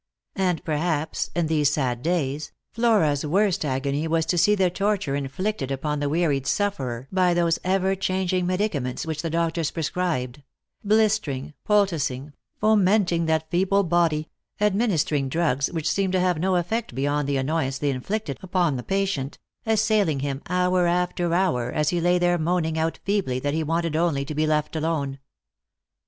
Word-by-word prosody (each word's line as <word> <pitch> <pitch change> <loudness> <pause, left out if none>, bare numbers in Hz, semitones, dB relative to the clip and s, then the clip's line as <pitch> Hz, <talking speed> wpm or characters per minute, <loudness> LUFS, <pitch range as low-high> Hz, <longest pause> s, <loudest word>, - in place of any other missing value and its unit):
And 180 -4 0
perhaps, 160 0 -1
in 175 -1 +1
these 150 -2 +2
sad 125 -5 -1
days, 155 -3 -1 0.2
Flora's 205 -12 +2
worst 190 +4 +1
agony 140 +2 -1
was 160 0 +1
to 175 - 0
see 210 +5 +4
the 185 -3 +2
torture 195 -7 0
inflicted 140 +3 -3
upon 150 +2 -2
the 145 0 -1
wearied 150 -4 0
sufferer 135 - -1
by 180 -2 +2
those 170 -1 +2
ever 190 +1 +1
changing 185 -1 0
medicaments 180 -11 -1
which 160 -2 -3
the 165 - -3
doctors 165 -1 0
pre 165 - -4
scribed; 145 -6 -2 0.4
blistering, 205 -11 +1 0.2
poulticing, 155 -9 +1 0.3
fomenting 200 -5 +3
that 160 0 0
feeble 195 +3 +2
body; 165 -3 +1 0.3
administering 190 - +1
drugs 140 -3 0
which 165 -3 -2
seemed 195 -2 0
to 185 - +3
have 180 -3 +1
no 185 +2 +1
effect 180 - -2
beyond 145 +1 0
the 140 - +1
annoyance 135 0 -1
they 145 0 0
inflicted 140 +4 -3
upon 175 -6 0
the - - -4
patient; 195 -8 -1 0.3
assailing 215 -9 +2
him, 140 0 -3
hour 180 0 +2
after 175 0 0
hour, 165 -10 +1
as 150 0 +1
he 175 -1 0
lay 175 +1 +3
there 175 0 +2
moaning 160 -1 0
out 160 +1 -1
feebly 200 -11 0
that 145 +2 -2
he 160 - 0
wanted 165 0 -1
only 160 -4 +1
to 150 - -5
be 155 +1 0
left 150 0 0
alone. 150 -4 -2
165 Hz, 165 wpm, -24 LUFS, 145-185 Hz, 0.4 s, see